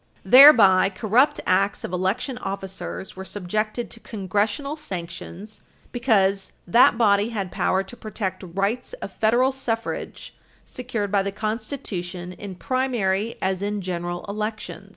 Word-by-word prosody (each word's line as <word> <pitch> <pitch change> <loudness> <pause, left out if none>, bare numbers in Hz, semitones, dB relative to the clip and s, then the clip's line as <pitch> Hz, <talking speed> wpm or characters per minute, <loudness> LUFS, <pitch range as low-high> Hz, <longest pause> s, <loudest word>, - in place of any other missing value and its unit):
Thereby, 205 -6 +8
corrupt 225 +7 +2
acts 195 +2 +1
of - - -5
election 210 +8 -1
officers 195 -2 -6
were 190 - -7
subjected 215 +5 -3
to 230 - -10
Congressional 215 +8 -2
sanctions 200 - -8 0.3
because 200 -6 +1
that 230 +5 +5
body 205 -2 +3
had 200 -6 -4
power 190 +1 +1
to 195 +5 -11
protect 200 -5 -5
rights 210 - -1
of - - -7
Federal 240 +4 +2
suffrage 235 -4 -4 0.3
secured 230 -5 -4
by 200 -1 +3
the 200 +1 -3
Constitution 195 -5 -5
in 195 0 -8
primary 230 -3 -1
as 190 0 0
in 205 +1 -2
general 175 0 -4
elections. 215 +2 -5
205 Hz, 130 wpm, -23 LUFS, 190-235 Hz, 0.3 s, Thereby